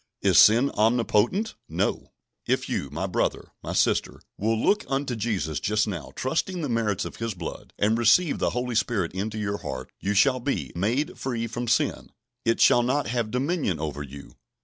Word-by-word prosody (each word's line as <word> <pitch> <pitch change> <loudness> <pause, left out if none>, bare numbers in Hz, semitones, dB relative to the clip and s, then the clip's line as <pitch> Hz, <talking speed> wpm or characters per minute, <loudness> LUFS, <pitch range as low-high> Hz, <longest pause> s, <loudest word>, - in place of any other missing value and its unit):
Is - - +5
sin 120 +6 +6
omnipotent? 120 - +2 0.2
No! - - -2 0.3
If - - 0
you, 70 - -2
my 80 +7 -3
brother, 95 - -1
my - - -5
sister, - - +1 0.2
will 110 +2 0
look 210 - +2
unto 135 -2 -1
Jesus 100 -10 -2
just 105 +1 +1
now, 85 -8 -5
trusting 165 +6 -1
the 145 - -2
merits 110 -5 0
of - - -8
His 115 -3 -3
blood, 85 -2 -7
and 105 +2 +2
receive 120 - +4
the - - +1
Holy 125 0 -2
Spirit 105 -6 0
into 105 +3 -3
your 100 -1 -2
heart, 65 0 -6
you 100 +1 -1
shall 130 +5 +4
be 135 +3 -2
"made 115 - -1
free 120 -3 -2
from 120 +1 -4
sin"; 115 - 0 0.4
it 115 0 +2
"shall 120 - +6
not 130 +4 0
have 120 -2 -1
dominion 130 - -1
over 75 -2 -4
you." 70 0 -10
115 Hz, 180 wpm, -25 LUFS, 100-125 Hz, 0.4 s, sin